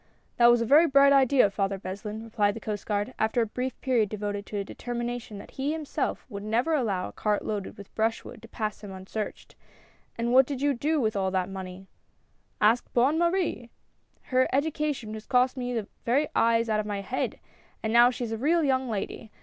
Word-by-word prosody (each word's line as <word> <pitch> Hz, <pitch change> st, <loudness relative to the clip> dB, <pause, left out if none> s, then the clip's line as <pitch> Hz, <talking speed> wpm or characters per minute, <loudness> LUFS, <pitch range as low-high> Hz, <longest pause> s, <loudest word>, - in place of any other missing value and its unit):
"That 235 Hz, -, +6 dB
was 240 Hz, 0 st, +5 dB
a -, -, +1 dB
very 300 Hz, +8 st, +6 dB
bright 280 Hz, 0 st, +6 dB
idea. 265 Hz, -5 st, +4 dB
Father 195 Hz, -1 st, -1 dB
Beslin," 205 Hz, +3 st, -6 dB
re 230 Hz, -, -11 dB
plied 205 Hz, -2 st, +1 dB
the -, -, -5 dB
Coast 210 Hz, -2 st, -5 dB
Guard, 205 Hz, +3 st, -1 dB
after 220 Hz, +2 st, +1 dB
a 230 Hz, -, +3 dB
brief 250 Hz, +4 st, -4 dB
period 240 Hz, -6 st, +2 dB
devoted 205 Hz, -1 st, -4 dB
to 210 Hz, -, -5 dB
a 200 Hz, -, -1 dB
determination 240 Hz, -1 st, -5 dB
that 200 Hz, -, -11 dB
he 285 Hz, +2 st, 0 dB
himself 310 Hz, -2 st, -3 dB
would 200 Hz, -5 st, -7 dB
never 230 Hz, +9 st, 0 dB
allow 210 Hz, -11 st, 0 dB
a -, -, -9 dB
cart 210 Hz, -1 st, -1 dB
loaded 205 Hz, -2 st, -4 dB
with 200 Hz, -1 st, -12 dB
brush 225 Hz, +1 st, 0 dB
wood -, -, -10 dB
to 230 Hz, -, -12 dB
pass 215 Hz, -2 st, -4 dB
him 200 Hz, -, -7 dB
unsearched; 190 Hz, +3 st, -6 dB, 0.6 s
"and 235 Hz, +1 st, 0 dB
what 260 Hz, 0 st, +6 dB
did 280 Hz, -3 st, -4 dB
you 285 Hz, +1 st, +2 dB
do 300 Hz, +5 st, 0 dB
with 220 Hz, -4 st, 0 dB
all 190 Hz, -1 st, +1 dB
that 185 Hz, -1 st, -1 dB
money? 190 Hz, 0 st, -7 dB, 0.2 s
" -, -, -42 dB
" -, -, -42 dB
Ask 235 Hz, +2 st, -1 dB
Bonne 270 Hz, +7 st, +3 dB
Marie! 340 Hz, -9 st, 0 dB, 0.5 s
Her 255 Hz, 0 st, +2 dB
education 285 Hz, -5 st, -1 dB
has 220 Hz, 0 st, -8 dB
cost 250 Hz, +1 st, +3 dB
me 250 Hz, -1 st, -3 dB
the 225 Hz, -4 st, -2 dB, 0.2 s
very 275 Hz, +6 st, +2 dB
eyes 230 Hz, 0 st, +3 dB
out 215 Hz, -1 st, +1 dB
of 210 Hz, -, -3 dB
my 205 Hz, -1 st, -3 dB
head; 245 Hz, +6 st, -3 dB, 0.4 s
but 220 Hz, -, -1 dB
now 240 Hz, +1 st, +7 dB
she 250 Hz, 0 st, -4 dB
is 230 Hz, -, -4 dB
a 225 Hz, -, -2 dB
real 325 Hz, +6 st, +2 dB
young 260 Hz, -2 st, +1 dB
lady. 215 Hz, +1 st, -4 dB
230 Hz, 220 wpm, -27 LUFS, 210-260 Hz, 0.6 s, now